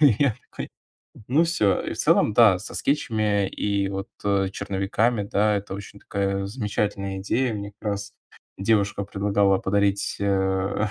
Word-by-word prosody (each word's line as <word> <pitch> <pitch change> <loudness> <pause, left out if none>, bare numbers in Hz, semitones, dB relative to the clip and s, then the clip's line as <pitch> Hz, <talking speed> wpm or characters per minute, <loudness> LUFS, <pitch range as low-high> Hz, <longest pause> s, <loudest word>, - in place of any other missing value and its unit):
И 140 -9 +6
я 140 -7 +3 0.2
такой: - - -6 0.6
"Ну, 155 +6 +4
всё". 110 - +2
И - - -4
в - - -12
целом, 105 - +3
да, 105 -6 +6
со 105 - -9
скетчами 110 -8 +1
и 100 -1 -1
вот, 95 0 -4 0.2
э, 100 -1 +2
черновиками, 100 +4 0
да, 105 +1 +2
это 100 -1 -5
очень 100 0 -9
такая 100 -1 -2
замечательная 100 -3 -2
идея. 115 +4 0
Мне 100 0 -6
как 105 - -2
раз 100 0 -5 0.5
девушка 100 -1 +1
предлагала 100 -1 +2
подарить, 100 0 0
э, 95 +1 +1
100 Hz, 155 wpm, -24 LUFS, 100-105 Hz, 0.6 s, И